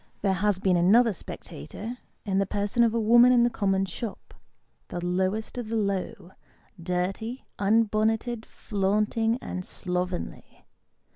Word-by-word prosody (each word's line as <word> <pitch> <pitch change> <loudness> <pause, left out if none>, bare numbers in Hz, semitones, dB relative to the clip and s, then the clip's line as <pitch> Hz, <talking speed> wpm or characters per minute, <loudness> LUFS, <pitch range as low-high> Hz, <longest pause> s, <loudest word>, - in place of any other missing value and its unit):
There 195 -2 +3
has 200 +1 +1
been 185 -2 +2
another 215 +6 +5
spectator, 210 - -8 0.3
in 195 -2 +1
the 195 - +1
person 205 +4 0
of 230 -1 +2
a - - +2
woman 240 +3 +6
in 245 -1 +5
the 240 - +2
common 195 -3 +1
shop; 200 +3 -7 0.5
the 175 0 -5
lowest 190 +6 -1
of 230 -3 -5
the 225 - -2
low; 195 -3 -2 0.5
dirty, 190 +8 -3
unbonneted, 220 +2 +1
flaunting, 215 +3 0
and 185 - -4
slovenly. 180 0 -4
205 Hz, 135 wpm, -27 LUFS, 185-225 Hz, 0.5 s, woman